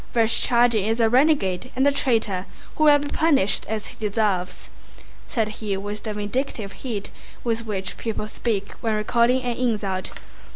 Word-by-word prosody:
"Vereshchágin 235 -1 +3
is 225 +2 0
a 225 -1 +4
renegade 250 - +2
and 265 +2 +2
a 285 - +5
traitor 220 -9 0 0.3
who 310 - +2
will 295 -1 +8
be 290 0 -4
punished 285 -13 +2
as 215 -1 -2
he - - -10
deserves," 200 -4 -1 0.6
said 225 -3 0
he 210 -2 -3
with 205 +2 -5
the 215 - -4
vindictive 210 0 -3
heat 215 -5 -5 0.3
with 230 -1 -1
which 190 -3 -3
people 220 -2 -3
speak 215 -2 -2
when 225 -2 0
recalling 235 +4 +2
an 245 -1 -2
insult. 210 -6 -1
225 Hz, 160 wpm, -23 LUFS, 205-245 Hz, 0.6 s, will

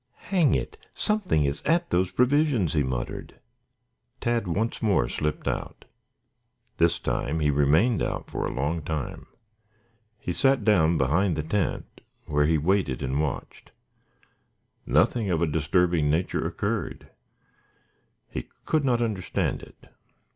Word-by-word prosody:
"Hang 175 -7 +4
it! 435 - -4 0.2
Something 205 - +1
is 70 +2 -2
at 170 +2 +1
those 90 +1 +2
provisions," 125 - +2
he 75 - +2
muttered. 65 -3 -4 0.8
Tad 120 -4 0
once 105 +7 -1
more 100 - +2
slipped 75 +3 -3
out. - - -4 0.9
This 85 0 +3
time 75 +6 -2
he 75 -1 +2
remained 75 - +3
out - - -2
for - - -4
a - - -3
long 75 +5 -1
time. 75 -1 -4 0.9
He 90 -5 -4
sat 135 +1 +2
down 85 -6 +4
behind 80 +7 +2
the 75 - -2
tent 90 +5 -2 0.2
where 75 0 +2
he 80 0 +3
waited 85 -3 0
and 65 +3 0
watched. 75 -4 -5 1.2
Nothing 115 -5 +2
of 85 -3 +1
a 85 - +2
disturbing 80 +1 +1
nature 80 +5 0
occurred. - - -3 1.2
He 60 - -6 0.2
could 155 -2 +1
not 120 -3 +2
understand 105 -6 -2
it. - - -15
85 Hz, 135 wpm, -26 LUFS, 75-115 Hz, 1.2 s, Hang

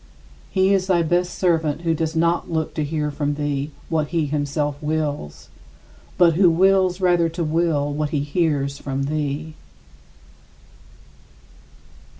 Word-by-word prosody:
He 190 0 +2
is 190 -1 +1
thy 175 -3 +3
best 175 +2 0
servant 165 -4 +1
who 165 -1 +1
does 160 0 -2
not 170 +1 +1
look 160 -1 -1
to 155 - -2
hear 150 0 -2
from 145 0 -2
thee 145 -1 -2 0.2
what 155 -2 0
he 165 -1 0
himself 145 0 -1
wills, 150 - -3 0.7
but 175 -2 +5
who 180 +2 +5
wills 185 +1 +3
rather 175 -3 +3
to 170 +1 -3
will 155 -2 0
what 150 0 -1
he 145 -1 -1
hears 145 -2 -1
from 135 0 -3
thee. 150 +1 -3
155 Hz, 140 wpm, -22 LUFS, 145-170 Hz, 0.7 s, but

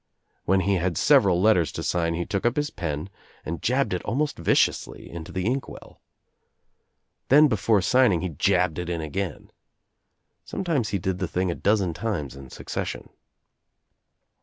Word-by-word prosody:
When 95 +1 +3
he 100 +1 +1
had 90 -2 -1
several 100 -12 +4
letters 90 -6 +3
to - - -5
sign 85 -1 0
he 85 +1 -2
took 100 - -2
up 120 0 +1
his 150 +1 -1
pen 75 -1 -4 0.4
and 85 +2 -4
jabbed 130 -2 +1
it 90 - -2
almost 145 +8 -1
viciously - - +1
Into 85 -1 -8
the 95 0 -3
Inkwell. 130 +4 -4 1.3
Then 150 +3 +7
before 105 -4 +2
signing 125 -9 +3
he 90 - -2
jabbed 90 +1 +1
it 90 -1 -4
In 85 -1 -2
again. 85 +2 -5 0.9
Sometimes 165 - -2
he 100 - 0
did 95 0 -2
the 95 - -1
thing 90 +1 -1
a - - -1
dozen 100 -4 +1
times 85 - -3
in 70 -1 -11
succession. - - -5
95 Hz, 160 wpm, -25 LUFS, 85-115 Hz, 1.3 s, Then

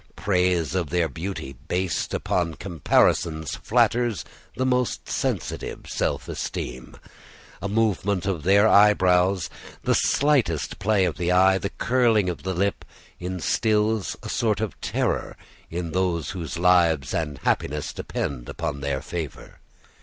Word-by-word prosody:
Praise 90 -4 +1
of 90 -5 -1
their 85 0 +1
beauty, 80 -6 -6
based 90 0 -1
upon 85 -3 -1
comparisons, 80 -2 +1
flatters 120 -3 +1 0.3
the 130 - +1
most 125 -1 0
sensitive - - -3
self - - -2
esteem. 60 0 -5 0.7
A 100 - -3
movement 100 -3 +1
of 95 -5 -1
their 100 +5 +5
eyebrows, 95 -3 +4 0.4
the - - +2
slightest 135 - +1
play 100 -1 +2
of 85 - -2
the 90 0 0
eye, 95 +1 +5
the 100 - -3
curling 115 -5 +2
of 85 - -8
the 95 -1 -3
lip, 100 +3 0 0.4
instils 105 +4 0
a - - -6
sort 110 -3 +1
of 110 -2 -4
terror - - -1 0.3
in 85 0 -4
those 90 -3 0
whose 85 -3 -5
lives 85 -6 +3
and 75 -4 -2
happiness 75 +1 -1
depend 60 -4 -4
upon 70 - -4
their 70 -1 -2
favor. 85 -5 -6
90 Hz, 130 wpm, -24 LUFS, 85-100 Hz, 0.7 s, their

